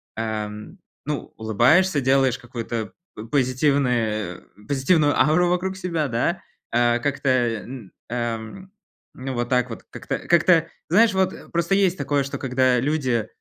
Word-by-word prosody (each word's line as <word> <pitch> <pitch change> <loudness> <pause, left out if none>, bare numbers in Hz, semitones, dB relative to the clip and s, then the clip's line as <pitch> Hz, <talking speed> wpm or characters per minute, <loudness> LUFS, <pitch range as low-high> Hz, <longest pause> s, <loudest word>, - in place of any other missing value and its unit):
ам, 110 - -5 0.3
ну, 150 0 -4
улыбаешься, 130 - +3
делаешь 130 -1 +2
какую-то 115 -3 -5 0.2
по 105 - -8
позитивное 125 - 0 0.3
позитивную 145 +2 +2
ауру 175 +3 +4
вокруг 185 +2 -1
себя, 170 -5 -2
да, 125 +9 -1 0.3
а 120 0 +2
как-то, 140 +1 -1 0.4
н 120 -6 -9 0.2
ам, 120 - -4 0.4
ну 130 +1 -5
вот 120 0 -2
так 125 -1 +1
вот 115 - -8
как-то - - -4
как-то. 170 -1 +3 0.2
Знаешь, 215 +5 +5
вот, 190 0 +1
э, - - -12
просто 170 +3 0
есть 190 -2 +2
такое, 145 0 0
что 140 - -5
когда 130 -1 +2
люди, 130 -5 0
135 Hz, 140 wpm, -23 LUFS, 120-165 Hz, 0.4 s, Знаешь